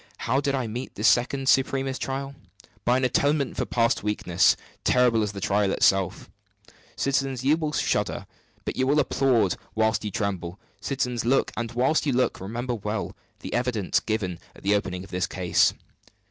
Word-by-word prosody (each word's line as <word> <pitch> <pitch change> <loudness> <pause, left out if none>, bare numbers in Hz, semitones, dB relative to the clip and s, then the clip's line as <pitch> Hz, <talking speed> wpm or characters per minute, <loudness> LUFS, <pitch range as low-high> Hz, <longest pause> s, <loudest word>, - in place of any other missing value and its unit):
How 130 +4 0
did 140 -1 0
I 130 -2 -1
meet 120 +4 -6
this 105 +3 +2
second 135 +2 +2
supremest 135 0 +2
trial? 135 +1 -3 0.5
By 125 +1 +4
an 130 - -1
atonement 140 +2 +1
for - - -2
past 115 +1 +1
weakness, 95 -4 +2 0.3
terrible 125 -3 +3
as 105 -2 -1
the 100 - -6
trial 100 +1 +1
itself. 95 -2 +2 0.7
Citizens, 135 -2 -1
you 145 +3 +4
will 155 -2 -2
shudder; - - -1 0.4
but - - -3
you 130 - +1
will 145 +2 +3
applaud 130 -8 +2 0.2
while 110 0 +2
you 105 - -3
tremble. 95 -3 -3 0.2
Citizens, 125 -3 -2
look! 130 +4 +2
and 120 0 -4
while 130 +6 +2
you 140 - 0
look, 125 -5 0
remember 120 +6 -3
well 105 -1 -4 0.3
the - - -6
evidence 120 -6 +1
given 100 -6 -3 0.2
at - - -16
the 100 - +2
opening 90 -3 -1
of 100 - -13
this 90 -1 -1
case. 90 -2 +2
120 Hz, 175 wpm, -25 LUFS, 105-135 Hz, 0.7 s, By